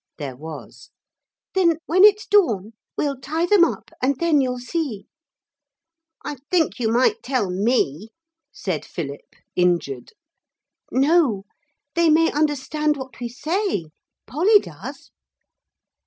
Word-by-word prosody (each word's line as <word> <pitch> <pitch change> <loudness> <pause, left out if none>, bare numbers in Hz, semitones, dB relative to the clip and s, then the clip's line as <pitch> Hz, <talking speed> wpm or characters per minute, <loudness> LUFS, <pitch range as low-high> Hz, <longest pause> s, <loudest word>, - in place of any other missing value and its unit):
There 140 -4 -6
was. 155 +3 -10 0.6
'Then 340 -4 +3
when 370 +4 +4
it's 420 0 +6
dawn 230 - +2 0.2
we'll 280 -3 -1
tie 320 +4 -1
them 380 0 +5
up - - -1
and 270 +2 +2
then 330 -4 +3
you'll 250 -1 -1
see.' 250 - -4 1.2
'I 295 -1 -4
think 330 -7 +1
you 225 -2 +1
might 260 - +2
tell 245 -8 -1
me,' 205 - 0 0.4
said 180 - -3
Philip, 145 -4 -7 0.2
injured. 170 -8 0 0.8
'No 270 - +2 0.5
they 335 -1 +3
may 325 +1 +4
understand 300 0 0
what 265 -2 -9
we 240 -1 -4
say. 285 - -2 0.3
Polly 345 - +4
does.' - - -8
275 Hz, 120 wpm, -22 LUFS, 200-330 Hz, 1.2 s, it's